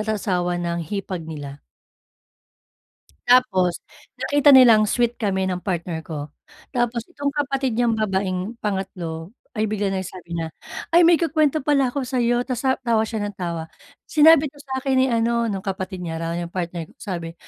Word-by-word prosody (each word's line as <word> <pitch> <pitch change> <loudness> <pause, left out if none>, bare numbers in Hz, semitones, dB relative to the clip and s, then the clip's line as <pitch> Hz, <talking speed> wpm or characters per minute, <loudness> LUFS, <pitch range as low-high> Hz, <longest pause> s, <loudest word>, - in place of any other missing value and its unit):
at 215 - -4
asawa 180 -4 -1
ng 170 0 -2
hipag 185 -3 -4
nila. 145 -3 -8 1.7
Tapos, 195 -9 +3 0.3
nakita 290 -1 +4
nilang 230 -5 +7
sweet 240 +2 0
kami 190 -4 0
ng 180 - -2
partner 175 -3 -3
ko. 150 -2 -6 0.4
Tapos 240 -2 -1
itong 285 -3 -3
kapatid 275 -4 -1
niyang 230 -1 +1
babaeng 190 0 -1
pangatlo 185 -2 -4 0.2
ay 215 +1 +1
bigla 205 -1 -1
nag 190 -1 -2
sabi 175 -2 -8
na, 160 -1 -4 0.4
"Ay 345 - +8
may 335 -1 +6
ikukwento 310 -2 +2
pala 275 -3 +3
ako 275 +1 -3
sayo," 245 -1 +1
tas 255 -3 -3
sa 265 -1 +1
tawa 230 -4 +1
siya 220 -1 -3
ng 205 - -6
tawa. 170 -3 -4 0.4
"Sinabi 310 0 +6
'to 285 0 -11
sa'kin 265 -1 -2
ni 260 - +4
ano," 235 0 +1
nung 195 -1 -4
kapatid 190 -1 -4
niya 165 0 -4
raw 165 +1 -2
yung 170 0 -5
partner 170 -2 -4
ko. - - -21
Sabi, 170 -5 -5
210 Hz, 170 wpm, -22 LUFS, 180-255 Hz, 1.7 s, Ay